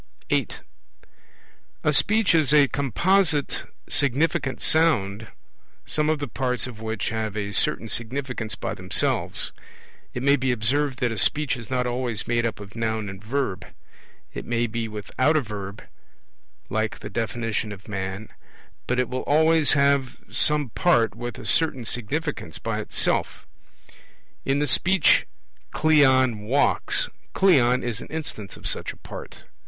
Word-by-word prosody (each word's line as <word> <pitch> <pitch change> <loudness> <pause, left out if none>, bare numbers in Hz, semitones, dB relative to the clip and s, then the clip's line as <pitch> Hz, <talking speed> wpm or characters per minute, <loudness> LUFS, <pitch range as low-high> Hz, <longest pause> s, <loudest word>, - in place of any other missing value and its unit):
(8) - - -1 1.2
A - - +2
Speech 220 -3 +3
is 155 -5 +3
a 145 -2 +6
composite 155 - +1 0.2
significant 145 +1 +1
sound, 110 -10 +2 0.6
some 150 0 +1
of 155 - +2
the 145 -1 -4
parts 125 0 0
of 120 -4 -9
which 110 -2 -3
have 110 -2 -3
a 100 -1 -3
certain 115 - +1
significance 115 -1 -3
by - - -4
themselves. - - +1 0.6
It 125 - -3
may 140 +1 +4
be 130 -1 0
observed 130 +4 0
that 125 -2 +1
a 110 - -2
Speech 145 +9 +2
is 115 -4 -9
not 125 -1 0
always 120 -2 -2
made 120 0 +1
up 110 - -6
of 100 0 -11
Noun 110 -2 -2
and 95 +1 -10
Verb; 115 -5 -2 0.7
it - - -6
may 120 0 0
be 115 0 -3
without 110 +8 0
a - - +2
Verb, 100 -3 -7 0.8
like 110 0 -2
the - - -8
definition 115 -2 -2
of 100 -2 -11
man; 95 0 -5 0.6
but 125 +1 0
it 125 - +1
will 130 +1 -3
always 160 +1 +4
have 140 -2 +2
some 150 -3 +2
part 115 - +2
with 120 +2 -6
a - - -9
certain 145 -7 +1
significance 120 - -2
by - - -3
itself. - - -1 1.0
In 135 +1 +1
the 145 - +1
Speech 175 +5 +4 0.5
'Cleon 130 -7 +4
walks', 120 +8 +2 0.3
'Cleon' 130 -10 +4
is 120 -2 -3
an - - -9
instance 140 -11 -6
of - - -14
such - - -3
a - - -20
part. - - -10
125 Hz, 150 wpm, -24 LUFS, 110-145 Hz, 1.2 s, a